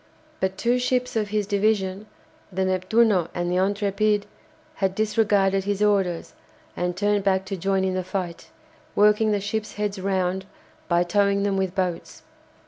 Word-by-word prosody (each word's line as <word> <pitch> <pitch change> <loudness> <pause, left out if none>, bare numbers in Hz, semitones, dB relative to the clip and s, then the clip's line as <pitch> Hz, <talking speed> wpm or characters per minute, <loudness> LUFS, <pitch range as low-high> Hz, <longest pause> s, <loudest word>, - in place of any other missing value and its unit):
But 190 0 -1
two 245 +1 +1
ships 250 0 0
of 215 -2 0
his 210 0 -1
division, 200 -1 0 0.4
the 190 +1 -1
"Neptuno" 185 0 +2
and 175 0 -1
the 180 - +1
"Intrépide," 205 +2 +1 0.5
had 190 -1 0
disregarded 205 -3 +2
his 205 0 0
orders, 195 -5 +1 0.4
and 180 0 -2
turned 205 0 +1
back 190 -1 +1
to 195 - -4
join 195 +1 0
in 190 -1 0
the 185 0 -1
fight, 180 -2 -5 0.5
working 210 +1 +4
the 205 - +1
ships' 210 +2 -3
heads 205 -2 -2
round 190 -1 -1 0.4
by 175 0 +3
towing 200 +2 +2
them 200 -1 +1
with 190 -1 -1
boats. 180 -3 -3
195 Hz, 155 wpm, -24 LUFS, 185-210 Hz, 0.5 s, working